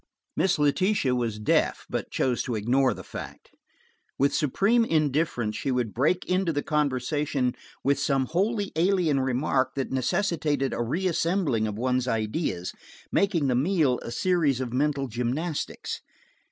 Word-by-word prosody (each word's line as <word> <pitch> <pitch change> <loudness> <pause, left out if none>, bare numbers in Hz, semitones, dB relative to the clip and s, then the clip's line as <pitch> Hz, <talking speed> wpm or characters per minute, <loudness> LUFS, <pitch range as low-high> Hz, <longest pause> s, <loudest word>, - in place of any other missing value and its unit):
Miss 190 -1 +2
Letitia 150 0 +2
was 120 -4 -1
deaf, 105 - +1
but - - -3
chose 125 -2 0
to 120 - -3
ignore 125 +5 +2
the - - -9
fact. - - -9 0.7
With 140 +1 +2
superb 200 - +2
indifference 145 -7 +1
she - - -2
would 125 -4 -1
break 155 +9 +1
into 185 -1 +1
the 145 -2 -2
conversation 140 -2 0 0.3
with 140 0 +2
some 135 -1 +1
wholly 200 - 0
alien 170 -4 +2
remark 130 0 0
that 135 -1 -2
necessitated 145 0 0
a - - -2
reassembling 165 - 0
of 105 -1 -4
one's 125 +1 0
ideas, 110 - -2 0.4
making 190 -7 +2
the 130 - +2
meal 145 -1 +2
a - - -7
series 150 -1 +1
of 125 -2 -4
mental 140 0 0
gymnastics. 130 +8 -3
140 Hz, 140 wpm, -26 LUFS, 125-165 Hz, 0.7 s, Miss